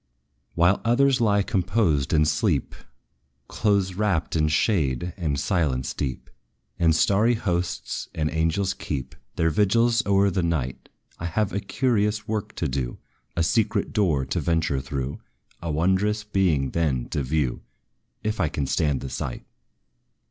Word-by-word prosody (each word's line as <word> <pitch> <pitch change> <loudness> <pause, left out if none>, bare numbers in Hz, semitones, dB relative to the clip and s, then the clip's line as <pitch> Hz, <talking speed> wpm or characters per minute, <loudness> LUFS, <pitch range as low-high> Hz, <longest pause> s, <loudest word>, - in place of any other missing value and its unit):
While 85 +4 +3
others 130 +2 +3
lie 100 -3 +3
composed 95 -7 +1
in 75 -1 +4
sleep, 75 - 0 0.7
Close 100 -3 +1
wrapped 95 -6 0
in 75 -1 +2
shade 80 - +1
and 75 -7 -1
silence 75 -8 0
deep, 65 -3 -4 0.5
And 80 -2 +4
starry 105 +8 +3
hosts 90 -5 -2
and 75 -1 0
angels 85 +4 0
keep 65 -3 -5 0.2
Their 80 0 +2
vigils 115 +7 +3
o'er 100 0 +4
the 95 - 0
night, 80 -7 -2 0.3
I 85 - -3
have 95 +4 -1
a 100 - 0
curious 105 0 0
work 110 -2 -3
to - - -1
do, 65 -2 -3 0.4
A 85 - +3
secret 110 +1 +1
door 85 - +2
to - - -2
venture 80 -5 0
through, 65 0 -4 0.4
A 85 - -4
wondrous 95 +7 +1
being 90 -10 +1
then 70 -7 0
to 75 - -1
view; 70 -1 -1 0.6
If 110 0 -2
I 80 -6 +2
can 70 -1 -2
stand 70 0 0
the 65 - -5
sight. 60 - -5
85 Hz, 145 wpm, -25 LUFS, 75-105 Hz, 0.7 s, in